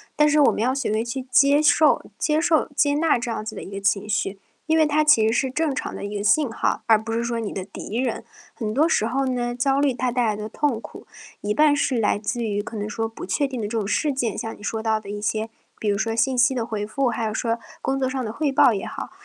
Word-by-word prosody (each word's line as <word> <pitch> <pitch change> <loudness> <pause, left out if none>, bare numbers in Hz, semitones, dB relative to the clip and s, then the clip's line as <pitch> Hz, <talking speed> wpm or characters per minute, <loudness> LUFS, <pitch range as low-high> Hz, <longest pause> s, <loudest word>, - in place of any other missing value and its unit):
但 300 0 +4
是 300 +1 +3
我 285 - +6
们 - - -3
要 255 +3 +2
学 275 -5 -1
会 220 +1 0
去 255 +2 -4
接 280 +3 +5
受 305 0 +4
接 305 0 +1
受 325 -2 +2
接 285 0 +3
纳 315 -3 +3
这 235 0 -4
样 220 - -3
子 220 0 -6
的 - - -7
一 - - -10
个 195 0 -5
情 200 0 +1
绪， 200 -1 -1 0.3
因 320 - +3
为 315 - +5
它 300 +1 +2
其 300 -8 +5
实 225 - +1
是 260 +2 +1
正 305 +2 0
常 - - -4
的 - - -7
一 205 +1 -5
个 200 - -3
信 285 +6 +3
号， - - -1
而 225 - +6
不 225 - -6
是 230 +1 -1
说 235 -1 -2
你 220 -3 -4
的 190 -1 -5
敌 205 +2 -7
人。 255 +1 -1 0.3
很 215 -3 -3
多 310 +6 +3
时 220 - +1
候 270 +3 0
呢， 245 -2 -1
焦 270 +2 +1
虑 280 -3 +2
它 250 +1 -1
带 245 0 +1
来 215 -2 0
的 215 - -5
痛 265 0 -1
苦， - - -11 0.4
一 210 0 -1
半 300 +2 +4
是 270 -3 0
来 210 -2 +2
自 235 +3 -3
于 205 -2 -1
可 220 +1 -7
能 210 0 -3
说 225 0 -2
不 225 - -8
确 190 +10 0
定 260 -3 -5
的 210 - -2
这 230 - -3
种 215 - -1
事 285 +8 0
件， 240 -5 -2
像 225 - -5
你 205 - -15
说 220 +1 -2
到 220 -1 +1
的 200 - -11
一 205 - -4
些， 220 +1 -1 0.3
比 215 - -1
如 200 - +1
说 225 +2 -1
信 255 +2 +1
息 245 +2 +4
的 235 -2 -1
回 210 -2 -4
复， 265 +2 0
还 230 -1 -2
有 215 - -2
说 230 0 -1 0.2
工 270 0 -1
作 260 -1 0
上 260 -1 -3
的 215 - -4
汇 290 +3 -1
报 260 -4 +5
也 195 - -3
好。 275 -1 -6
235 Hz, 310 characters per minute, -23 LUFS, 215-275 Hz, 0.4 s, 我